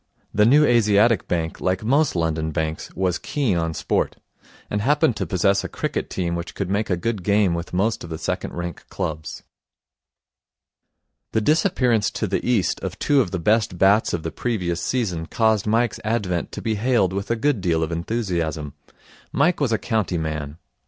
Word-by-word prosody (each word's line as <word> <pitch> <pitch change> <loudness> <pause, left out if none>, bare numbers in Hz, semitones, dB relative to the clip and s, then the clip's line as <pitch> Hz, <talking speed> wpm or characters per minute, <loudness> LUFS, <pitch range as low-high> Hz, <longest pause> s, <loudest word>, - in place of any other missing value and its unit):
The 105 +1 +4
New 150 +5 +6
Asiatic 115 -2 +3
Bank, 80 -2 -2
like 95 +2 0
most 140 +4 +2
London 80 -2 0
banks, 80 0 -3
was 90 -1 0
keen 135 -10 0
on 80 -1 -1
sport, - - 0 0.5
and 105 - -2
happened 140 -1 +3
to - - -2
possess 100 +1 +2
a - - -4
cricket - - -3
team 85 -2 -2
which 85 0 -5
could 95 -2 -3
make 105 +2 0
a 90 - +1
good 105 +3 -2
game 100 -1 +2
with 85 +1 -4
most 110 +5 0
of 85 - -8
the 80 - -4
second - - -3
rank 85 -2 -5
clubs. 75 -1 -5 1.9
The 110 - +2
disappearance 125 - +2
to 110 - 0
the 100 -1 -1
East 120 -6 +1
of - - -5
two 145 -2 +3
of 100 - -1
the 95 - -2
best 105 +1 +1
bats 100 +4 +4
of 85 -2 -2
the 80 - -3
previous 90 -8 -2
season 90 -11 -1
caused 110 -1 +1
Mike's 115 +2 +1
advent 100 -6 -1
to - - -6
be 110 - 0
hailed 110 -4 +1
with 100 +1 -3
a 115 - +2
good 125 -2 0
deal 85 -3 +1
of 80 - -3
enthusiasm. 85 - -2 0.6
Mike 160 +6 +2
was 140 -5 +1
a 110 - +3
county 105 -6 -1
man. 75 -2 -4
100 Hz, 185 wpm, -23 LUFS, 85-115 Hz, 1.9 s, New